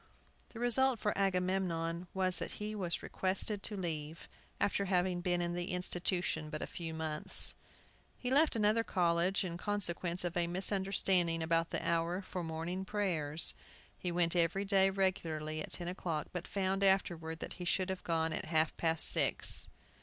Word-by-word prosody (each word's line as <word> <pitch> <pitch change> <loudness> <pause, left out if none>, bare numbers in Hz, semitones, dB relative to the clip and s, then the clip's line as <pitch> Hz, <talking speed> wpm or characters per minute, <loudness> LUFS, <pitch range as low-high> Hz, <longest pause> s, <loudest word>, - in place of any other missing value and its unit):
The 230 - -10
result 245 +1 +4
for 210 -1 -1
Agamemnon 180 -3 -1
was 185 -1 +1
that - - -5
he 210 +1 -5
was 180 -5 -3
requested 195 +2 -1
to 210 0 -3
leave, 160 -3 -5 0.3
after 200 0 +1
having 180 -1 +1
been 175 -1 0
in 170 0 -2
the 175 0 -3
institution 180 -3 -1
but 155 0 -4
a - - -2
few 165 -2 -6
months. 160 -1 0 0.6
He 250 - -4
left 295 +2 +4
another 215 +1 +2
college 175 -1 +1
in 170 -1 -4
consequence 180 -3 +1
of 175 -1 -3
a 175 -1 +1
misunderstanding 185 -2 +2
about 165 0 +1
the - - -3
hour 170 +3 0
for 180 -1 -5
morning 165 +3 -4
prayers. 170 -7 0 0.4
He 180 - -4
went 170 0 +1
every 175 +3 +1
day 195 -1 +4
regularly 160 -5 -1
at - - -7
ten 175 - -4
o'clock, 170 -4 -3
but 180 -1 -4
found, 195 0 -1
afterward, 170 -4 +1
that - - -6
he - - -4
should 185 +1 0
have 190 - -5
gone 165 -1 0
at - - -3
half 160 -1 +1
past 165 -1 +3
six. - - +4
180 Hz, 170 wpm, -34 LUFS, 165-195 Hz, 0.6 s, result